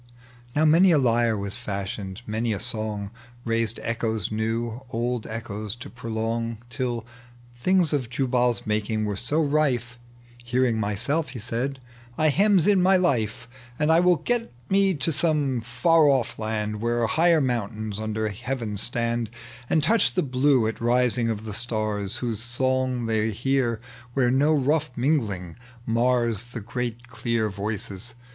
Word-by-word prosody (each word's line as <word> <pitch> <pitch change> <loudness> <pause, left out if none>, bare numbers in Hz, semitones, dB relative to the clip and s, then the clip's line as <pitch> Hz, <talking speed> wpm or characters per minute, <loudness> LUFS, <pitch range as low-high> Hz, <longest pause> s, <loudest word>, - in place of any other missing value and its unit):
Now 155 +2 +3
many 170 +4 +6
a 160 - +5
IjTe 120 -4 +2
was 100 +3 -3
fashioned, 100 -1 -5
many 110 +1 -1
a 100 - -3
song 110 -3 -4 0.3
liaised 115 -1 0
echoes 110 -3 -1
new, 115 +2 -2
old 120 -1 -2
echoes 110 -1 -4
to 120 - -10
prolong. 115 -1 -3
Till 120 -3 -2 0.6
tilings 180 -4 +3
of 130 -6 -1
Jubal'a 125 -1 +1
maMng 110 0 -1
were 105 -1 -2
so 145 +10 0
rife, 130 -5 0 0.2
" 120 0 -23
Hearing 120 -1 +1
myself," 120 +10 0
he 130 -2 -7
said, 125 +5 -3 0.2
" 120 0 -24
heme 180 +4 +4
in 200 -3 +5
my 190 +1 +5
life, 115 - 0 0.3
And 150 +1 +2
I 165 - +6
will 180 0 +5
get 230 +9 -1 0.2
me 195 -1 +4
to 150 +3 +1
some 145 -6 +1
far 150 +7 +3
off 130 -4 +1
land, 105 -1 -2
Where 120 0 +1
higher 165 +6 +4
mountains 110 -5 -2
under 110 0 -2
heaven 110 0 -4
stand 115 0 0 0.4
And 155 - +2
touch 225 +7 +3
the 180 - +2
blue 130 -2 +3
at 110 +1 -3
rising 120 0 +2
of 110 -1 -3
the 105 - -5
stars, 110 -2 -1
Whose 115 -2 -2
song 130 0 0
they 110 -1 +1
hear 120 +1 0 0.4
where 125 -3 +3
no 140 +4 +3
rough 150 +1 +2
mingling 110 - -1 0.3
The 120 -1 0
great 120 0 -4
clear 115 -2 -1
voices. 100 +2 -5
120 Hz, 150 wpm, -25 LUFS, 110-135 Hz, 0.6 s, many